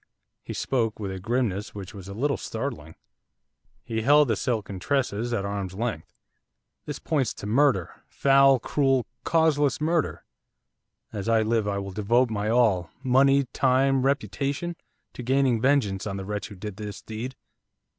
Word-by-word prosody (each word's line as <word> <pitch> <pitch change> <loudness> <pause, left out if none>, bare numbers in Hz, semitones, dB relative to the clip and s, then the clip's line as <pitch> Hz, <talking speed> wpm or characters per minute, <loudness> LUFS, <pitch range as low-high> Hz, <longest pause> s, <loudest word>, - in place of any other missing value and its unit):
He - - -7
spoke 115 -5 -1
with 100 -2 -4
a 95 - -5
grimness 105 -2 -1
which 95 -3 -7
was 95 -3 -10
a 100 - -7
little 140 +5 0
startling. 80 -7 -5 0.9
He 115 -2 -3
held 145 +3 +5
the 110 - +2
silken 100 -4 -2
tresses 120 -1 -1
at 105 -4 -1
arm's 100 -2 -4
length. 110 -6 -3 0.8
'This 150 - -4
points 140 -8 -1
to - - -8
murder, 115 - +1
foul, 135 -1 +5
cruel, 135 0 +1 0.2
causeless 160 -2 +2
murder. 160 +1 0 0.9
As 105 +1 -3
I 115 -1 +4
live, 110 -1 +1
I 100 -1 -1
will 100 0 -4
devote 115 +5 +2
my 105 0 -1
all, 110 -8 +3
money, 135 +2 +4
time, 135 0 +3
reputation! 140 +4 -1 0.4
to - - -7
gaining 130 -2 +2
vengeance 110 -8 +1
on 100 -1 -3
the 95 - -6
wretch 105 +1 -4
who 105 - -11
did 100 +1 -7
this 105 -1 -7
deed. 115 +4 -6
115 Hz, 155 wpm, -26 LUFS, 100-135 Hz, 0.9 s, held